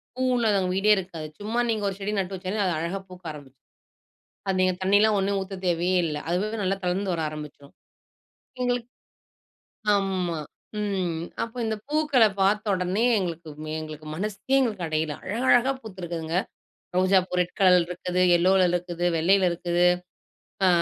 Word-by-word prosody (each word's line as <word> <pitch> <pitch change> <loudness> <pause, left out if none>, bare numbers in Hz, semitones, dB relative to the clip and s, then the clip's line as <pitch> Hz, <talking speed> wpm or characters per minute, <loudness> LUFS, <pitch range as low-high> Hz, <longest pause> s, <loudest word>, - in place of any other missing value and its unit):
பூ 255 - -2
இல்லாதவங்க 200 -6 +2
வீடே 210 +2 +3
இருக்காது. 170 -5 -5
சும்மா 220 +4 -2
நீங்க 220 -2 0
ஒரு 190 - -5
செடி 200 +1 -2
நட்டு 190 0 -2
வெச்சாலே 190 +3 -3 0.2
அழகா 170 +5 -2
பூக்க 185 -1 -13
ஆரம்பிச்சுரும். 135 -4 -13 0.8
அது 190 - +1
நீங்கத் 185 0 +1
தண்ணி 195 +2 +4
எல்லாம் 215 -1 +4
ஒன்னும் 200 +1 0
ஊத்த 195 0 -6
தேவையே 175 +2 +2
இல்ல. 150 -2 -2
அதுவாவே 210 +6 -1
நல்லா 190 +1 +1
தளர்ந்து 185 +2 0
வர 165 - -2
ஆரம்பிச்சுரும். 150 -2 -10 0.9
எங்களுக்கு 245 -1 -1 1.1
ஆமா. 185 -4 -1 0.4
ம் 190 -5 -1 0.3
அப்போ 230 +2 -7
இந்தப் 220 -1 -3
பூக்கள 300 -5 +3 0.2
பாத்த 205 +2 +3
உடனே 185 +4 0 0.2
எங்களுக்கு 170 -3 -4 0.3
எங்களுக்கு 155 -1 -8
மனசு 200 +3 -3 0.2
எங்களுக்கு 210 -9 0
அடையல. 155 -1 -1
அழகழகா 245 +4 +3
பூத்து 195 -5 -10
இருக்குதுங்க. 165 -1 -3 0.6
ரோஜாப்பூ 185 0 +3
ரெட் 180 - -4
கலர் 180 -3 +6
இருக்குது. 180 +1 -2 0.2
எல்லோல 185 +1 +4
இருக்குது. 175 0 -2
வெள்ளையில 185 +3 +4
இருக்குது. 175 +1 +1 0.8
அ, - - +5
185 Hz, 145 wpm, -25 LUFS, 175-205 Hz, 1.1 s, கலர்